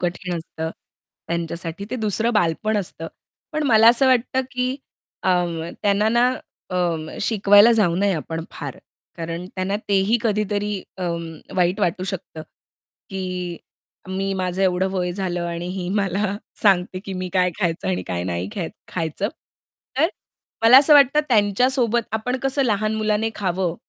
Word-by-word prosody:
कठीण 180 0 -2
असतं 160 -1 -5 0.6
त्यांच्यासाठी, 170 +2 -4
ते - - -2
दुसरं 220 +1 0
बालपण 210 +2 +1
असतं. 170 -4 -4 0.5
पण 310 0 -1
मला 225 -3 +7
असं 240 +3 +5
वाटतं, 260 0 +2
की 255 +1 -1 0.5
अ, - - +2 0.5
त्यांना 205 +1 +3
ना 240 +2 +4 0.4
अ, 170 -3 -2
शिकवायला 205 +1 +6
जाऊ 205 -7 +3
नये 200 +1 +2
आपण 165 +1 -4
फार. - - -7 0.4
कारण 165 +2 -5
त्यांना 190 +1 -1
तेही 200 +3 +3
कधीतरी 210 -2 -1 0.2
अ, - - -4 0.5
वाईट 180 +3 +2
वाटू 180 -1 0
शकतं, 185 -4 -5 0.7
की 185 -2 -4 0.5
मी 195 +1 -2
माझं 185 0 -1
एवढं 185 0 +2
वय 180 -2 -1
झालं 175 -2 -2
आणि 170 0 -4
ही 180 -1 -4
मला 200 0 0 0.3
सांगते, 185 -2 +3
की 195 - -5
मी 185 0 -3
काय 180 -1 +3
खायचं 165 - -1
आणि 90 0 -1
काय 90 -1 -2
नाही 90 +1 -2
ख्या 175 - -3 0.2
खायचं. 165 +4 -2 0.7
तर 320 +4 +4 0.5
मला 235 +3 +9
असं 295 +2 +6
वाटतं 285 +1 +6
त्यांच्यासोबत 235 +2 +3
आपण 220 +4 -1
कसं 270 +1 +1
लहान 215 -2 +1
मुलाने 215 0 0
खावं 185 -3 -1
195 Hz, 145 wpm, -22 LUFS, 175-220 Hz, 0.7 s, मला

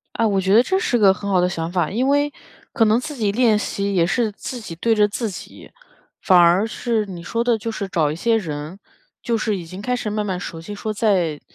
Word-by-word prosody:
啊， 230 - +1
我 195 -2 +1
觉 190 +2 +2
得 235 - +7
这 380 +7 0
是 260 - 0
个 200 -4 +5
很 200 +2 -6
好 190 -2 +3
的 180 - +2
想 165 -2 -4
法， 180 -2 0
因 245 +6 0
为 285 +1 +2 0.4
可 230 - +3
能 220 +2 +3
自 295 +2 -7
己 210 -5 0
练 225 -1 +3
习 200 -1 -2
也 170 -2 +3
是 220 +3 0
自 245 +4 -7
己 170 -6 -8
对 225 +7 +1
着 210 -1 +3
自 225 +2 -3
己， 195 - -10 0.5
反 185 -2 +5
而 175 +3 +5
是 225 0 -1
你 180 -3 -8
说 230 +7 -2
的 235 -2 +1
就 225 +2 -6
是 200 -3 -4
找 155 -5 +1
一 - - -4
些 225 +6 +1
人， 155 -2 -5 0.4
就 235 -1 0
是 215 -2 -1
已 175 - -7
经 185 +4 -9
开 250 +3 -1
始 245 - -4
慢 210 0 -2
慢 185 -3 -2
熟 165 -2 -7
悉 205 - -8
说 215 +1 -4
在 185 -8 0
210 Hz, 270 characters per minute, -21 LUFS, 180-230 Hz, 0.5 s, 得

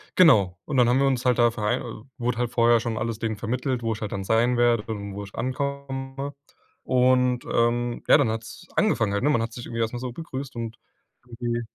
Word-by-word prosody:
Genau. 105 - +5
Und 140 -3 -2
dann 120 -1 +5
haben 125 +2 +3
wir 140 - +3
uns 130 -2 0
halt 125 -1 +3
da 120 0 +6
vere 110 0 -3
wurde 120 0 -1
halt 120 -1 -1
vorher 120 0 +4
schon 115 -1 -3
alles 110 0 -2
denen 110 -2 -2
vermittelt, 125 +3 -2
wo 115 -1 0
ich 110 - -9
halt 105 - -4
dann 95 - -3
sein 115 +4 +2
werde 120 -2 +3
und 100 -3 -5
wo 100 - -5
ich 100 - -12
ankomme. 135 +1 -4 0.5
Und 125 -1 +3
ähm, 120 +1 +1
ja, - - +8
dann 135 -7 +2
hat's 115 +10 -6
angefangen 115 - +2
halt, 100 - -1
ne? 145 - +3
Man 130 -6 +2
hat 115 0 -3
sich 120 - -7
irgendwie 115 0 -4
erst 115 +1 -1
mal 120 - -4
so 125 0 -4
begrüßt 135 -1 -7
und 115 -1 -5 0.5
irgendwie 120 0 -3
120 Hz, 225 wpm, -25 LUFS, 115-130 Hz, 0.5 s, ja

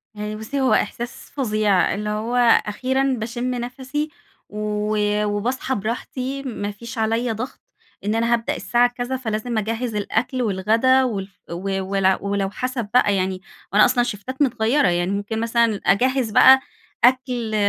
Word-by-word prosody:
يعني 210 0 -4
بُصّي 220 +6 -3
هو 260 - +3
إحساس 240 +3 -2
فظيع، 215 -8 +2
اللي 210 +1 -3
هو 215 +3 -2 0.3
أخيرًا 255 +6 -1 0.2
باشم 240 +3 -3
نفَسي 260 +5 -4 0.4
و 210 0 -2 0.3
وباصحى 240 +6 -1
براحتي، 255 +5 -4
ما 205 -5 -4
فيش 235 +4 -9
عليَّ 225 +2 0
ضغط 230 +5 -5 0.5
إن 210 - 0
أنا 230 +1 +2
هابدأ 230 -1 0
الساعة 240 +5 +2
كذا 245 +1 -3
فلازم 225 -1 -3
أجهِز 225 +2 -2
الأكل 225 +5 -1
والغدا 225 +5 +3
والف 200 -6 -4
و 195 +2 -2
ولو 190 0 +2
ولو 200 -1 -1
حسب 250 -1 -4
بقى 210 -5 +4
يعني، 185 0 -1 0.3
وأنا 210 - +7
أصلًا 245 - +2
شِفتات 245 +4 -5
متغيرة، 240 -1 +2
يعني 175 +2 +1
ممكن 205 +2 -2
مثلًا 230 -2 +1
أجهِز 250 +2 +2
بقى 265 +5 +8 0.4
أكل 245 -3 +2
225 Hz, 145 wpm, -22 LUFS, 205-250 Hz, 0.5 s, بقى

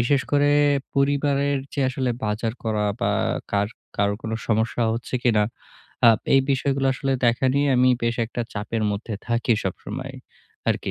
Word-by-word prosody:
বিশেষ 135 +4 +2
করে 145 0 +4 0.4
পরিবারের 140 0 +1 0.2
যে - - -1
আসলে 130 -1 -1
বাজার 110 +2 -1
করা 110 -2 0 0.2
বা - - +1 0.4
কার 100 0 +1 0.3
কারোর 100 0 +1
কোনো 110 0 -3
সমস্যা 110 +2 +1
হচ্ছে 115 +3 -5
কিনা 110 -4 +3 0.6
আ - - +10 0.3
এই 135 - +7
বিষয়গুলো 135 0 +1
আসলে 135 0 -1
দেখা 120 +3 +2
নিয়ে 140 +1 +2
আমি 125 +1 +5
বেশ 115 0 0
একটা 120 - -5
চাপের 110 +2 -3
মধ্যে 105 +2 -4
থাকি 120 0 +1
সবসময় 120 +8 -5 0.5
আরকি। - - 0
120 Hz, 155 wpm, -23 LUFS, 110-135 Hz, 0.6 s, আ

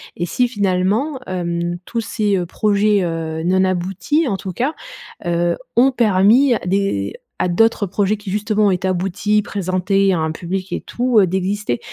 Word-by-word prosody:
Et 175 - -2
si 245 +8 +1
finalement, 205 +6 0
hem, 175 -1 -2
tous 235 - -4
ces, 210 -3 0
heu, 180 - -1
projets, 205 +1 +1
heu, 160 -1 -3
non 185 +2 +2
aboutis, 190 - 0
en 195 - -1
tout 190 -1 -6
cas, 260 - -1 0.5
heu, 170 0 0 0.2
ont 260 +3 +5
permis 235 +3 +4
à - - -2
des 180 - 0 0.3
à - - +2
d'autres 220 +4 +2
projets 205 +3 0
qui 205 -1 -9
justement 210 +1 +1
ont - - +3
été 185 0 -1
aboutis, 195 +3 0
présentés 195 0 0
à 175 - 0
un 160 0 -1
public 185 +2 -4
et - - -2
tout, 240 -5 +2
d'exister? 190 -5 -2
195 Hz, 170 wpm, -19 LUFS, 180-210 Hz, 0.5 s, ont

